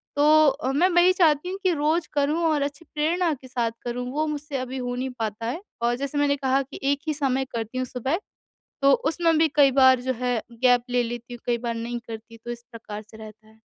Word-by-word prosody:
तो 305 +1 +6
अ, 270 -1 0
मैं 345 +6 +4
वही 350 +1 +5
चाहती 330 -1 +3
हूँ 385 +1 -5
कि 370 - +3
रोज़ 310 +3 0
करूँ 295 +3 +1
और 295 -2 +1
अच्छी 285 +3 -5
प्रेरणा 330 +2 +1
के 260 -1 -10
साथ 240 -2 -1
करूँ 245 +1 -3
वो 305 +2 0
मुझसे 295 -1 -4
अभी 255 0 -4
हो 245 -1 -3
नहीं 260 +1 -3
पाता 220 0 -3
है। 315 +10 -3 0.2
और 240 +1 +2
जैसे 280 +2 -4
मैंने 285 0 +3
कहा 270 0 +1
कि 270 - -11
एक 285 - 0
ही 310 - +1
समय 270 -2 0
करती 230 +2 -4
हूँ 255 - 0
सुबह, 260 +7 -2 0.6
तो 275 - +6
उसमें 330 +1 +1
भी 320 - +4
कई 280 -2 +6
बार 260 -1 +5
जो 260 +1 -1
है 245 -3 0 0.2
गैप 245 -1 +5
ले 245 0 +2
लेती 240 +1 -6
हूँ 240 - -8
कई 240 -1 +1
बार 235 0 -3
नहीं 235 +1 -4
करती, 230 0 -9
तो 240 +1 -7
इस 235 0 -8
प्रकार 215 -2 -8
से 220 +1 -16
रहता 215 0 -12
है। 220 0 -22
265 Hz, 235 wpm, -25 LUFS, 240-300 Hz, 0.6 s, तो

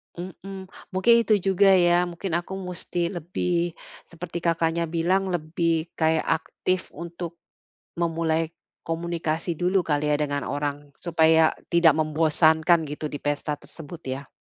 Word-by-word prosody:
Mhm. 190 +2 -8 0.2
Mungkin 190 +5 +5
itu 215 - +4 0.2
juga, 195 +1 +5
ya, 175 0 +4
mungkin 175 +2 -5
aku 175 +2 -8
musti 180 -2 -3
lebih 175 -1 -2 0.3
seperti 170 0 -7
Kakaknya 165 0 0
bilang 175 +4 +1
lebih 165 -1 -1
kayak 160 0 +2
aktif 185 +3 -2
untuk 170 0 -6 0.6
memulai 165 -1 0 0.3
komunikasi 165 0 -2
dulu 180 +4 +2
kali, 150 -1 0
ya, - - +4
dengan 145 -1 -1
orang 145 0 -3
supaya 160 -1 +4 0.2
tidak 170 -2 +6
membosankan 160 +2 +3
gitu 150 +2 -6
di 145 - -6
pesta 145 +1 -1
tersebut, 155 +2 -10
ya. 130 +1 -5
170 Hz, 130 wpm, -25 LUFS, 160-175 Hz, 0.6 s, tidak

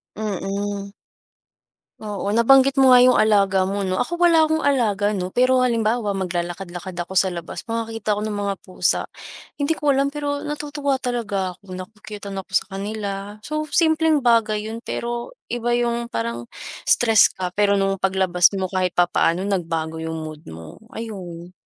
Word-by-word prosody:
Mm. 200 -1 -4 1.1
Oo. 205 -1 -4
Nabanggit 265 +4 +5
mo 260 -2 +7
nga 245 - +7
yung 255 - +5
alaga 195 -3 +3
mo 200 +1 -2
'no. 185 -1 -1
Ako 345 - -1
wala 325 -2 +5
akong 315 0 0
alaga 210 -7 +1
'no, 185 -3 -4
pero 255 +1 +4
halimbawa 230 -3 +1
maglalakad-lakad 175 0 -4
ako 175 +1 -5
sa 190 0 +3
labas, 170 +5 -6
makakita 225 -2 -2
ako 205 - -4
ng 210 -1 -3
mga 200 -1 -1
pusa, 185 - +1 0.6
hindi 285 +3 +1
ko 295 -2 +1
alam, 275 +1 +2
pero 285 0 -3
natutuwa 290 -1 -2
talaga 215 -8 -3
ako, 190 -2 -10
na-ku-cute-an 200 +1 -8
ako 190 - -11
sa - - +3
kanila. 205 +1 -4 0.3
So 305 +1 -3
simpleng 315 -2 +2
bagay 220 -2 +2
yun, 230 - -6
pero 240 - -5 0.2
iba 240 0 0
yung, 235 0 -1
parang 115 - -4 0.4
stress 225 -4 +6
ka, 180 -1 -3
pero 205 +1 +2
nung 195 -1 0
paglabas 185 -2 +3
mo 190 -1 -3
kahit 185 -2 -1
papaano 175 0 +2
nagbago 165 -5 -2
yung 160 0 -4
mood 155 -1 -8
mo, 80 0 -10 0.2
ayun. 180 -6 -7
205 Hz, 160 wpm, -22 LUFS, 185-240 Hz, 1.1 s, mo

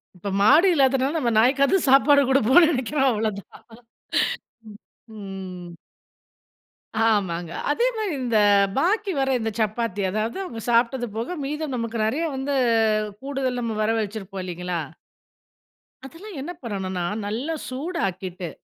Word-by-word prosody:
இ - - -18
ப்போ, 200 - -3
மாடு 295 - +6
இல்லாததுனால, 270 +1 +2
நம்ம 245 -6 0
நாய்க்காது 275 - +4
சாப்பாடு 280 +2 +6
குடுப்போம்ன்னு 275 +6 +5
நினைக்கிறோம். 270 0 +1
அவ்வளவுதான். 215 -3 -4 1.1
ம். 210 - -11 0.4
ம். 190 -3 -8 1.3
ஆமாங்க. 175 -6 0 0.2
அதே 470 +12 +2
மாரி 425 -5 -2
இந்த 235 -3 +1 0.4
பாக்கி 395 +5 +1
வர 270 0 +1
இந்த 225 - -2
சப்பாத்தி, 215 -2 -1
அதாவது, 215 +3 -2
அவங்க 235 -11 -7
சாப்பிட்டது 240 +1 +2
போக 240 +11 -3
மீதம் 300 -1 -3
நமக்கு 230 -1 -3
நிறையா 320 +9 -1
வந்து, 270 +2 -2 0.7
கூடுதல் 265 -2 -2
நம்ம 230 -2 -3
வர 215 - +1
வச்சிருப்போம், 195 -3 -5
இல்லைங்களா? 180 -1 -4 1.3
அதெல்லாம் 365 +6 -11
என்ன 295 - -5
பண்ணணும்னா, 190 -5 -3 0.2
நல்லா 250 +10 -3
சூடாக்கி 255 - -3
விட்டு, 180 -1 -7
235 Hz, 125 wpm, -23 LUFS, 205-280 Hz, 1.3 s, மாடு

